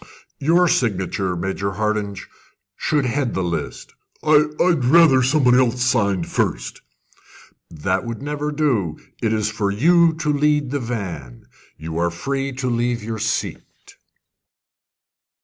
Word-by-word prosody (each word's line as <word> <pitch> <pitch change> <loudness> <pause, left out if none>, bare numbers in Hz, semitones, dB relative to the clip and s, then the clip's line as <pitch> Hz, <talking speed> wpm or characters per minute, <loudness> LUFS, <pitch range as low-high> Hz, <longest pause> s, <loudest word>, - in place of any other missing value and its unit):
"Your 170 +5 +3
signature, 95 - 0
Major 95 +2 -3
Hardinge, 105 -2 -2 0.5
should 145 +4 0
head 125 0 -1
the 95 - -1
list." 85 -1 -4 0.3
"I 150 -1 +5
I 180 - +4
I'd 160 -8 +1
rather 145 -1 +6
somebody 130 -1 +4
else 125 -1 +1
signed 100 -8 +1
first." - - -2 0.9
"That 90 +4 -2
would 115 -1 -5
never 150 +1 -3
do: 125 - 0 0.2
it 110 - 0
is 110 -1 0
for 105 -2 -1
you 165 +10 +4
to 155 -2 -1
lead 150 -2 +1
the 145 - -1
van. 95 - -6 0.3
You 80 +1 -5
are 85 0 +1
free 135 +10 -3
to 130 0 -4
leave 120 -1 -1
your 110 0 -4
seat." 110 0 -2
120 Hz, 135 wpm, -21 LUFS, 100-145 Hz, 0.9 s, rather